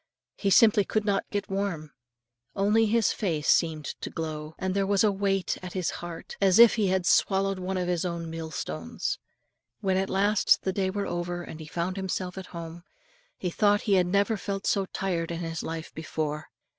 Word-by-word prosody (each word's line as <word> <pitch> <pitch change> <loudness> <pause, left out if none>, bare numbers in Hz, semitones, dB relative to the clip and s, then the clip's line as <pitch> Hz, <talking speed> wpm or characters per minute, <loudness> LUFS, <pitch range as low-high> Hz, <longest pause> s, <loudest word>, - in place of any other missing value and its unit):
He 200 - -1
simply 210 +1 +6
could 215 +1 -1
not 200 -2 0
get 205 -1 -2
warm, 195 -6 -3 0.6
only 210 +3 +3
his 225 0 +3
face 160 -7 -2
seemed 160 -3 +3 0.2
to - - -4
glow; 155 -1 -5
and 190 0 -2
there 195 0 +1
was 200 0 +3
a 210 - +4
weight 195 -1 0
at 180 -1 -7
his 185 -3 -1
heart, 170 -1 -8
as 195 -1 +5
if 235 -1 +9
he 215 -4 +1
had 185 -1 +1
swallowed 195 0 +2
one 185 +1 -2
of 180 -1 -1
his 175 -2 0
own 170 -2 -3
millstones. 160 - -4 0.6
When 190 -1 +1
at 190 0 0
last 200 +1 +3
the 190 - -1
day 190 -1 0
wore 200 +1 -2
over, 175 0 -3
and 160 - -9
he 155 - -8
found 175 +4 -3
himself 185 -1 -3
at 190 - -9
home, 170 0 -8 0.6
he 180 - -3
thought 205 +2 +3
he 205 - +1
had 180 -2 +4
never 200 +4 +2
felt 195 0 -4
so 195 -1 +1
tired 175 -4 -2
in 170 0 -4
his 165 -1 -3
life 165 0 -6
before. 155 -1 -3
185 Hz, 195 wpm, -27 LUFS, 165-200 Hz, 0.6 s, if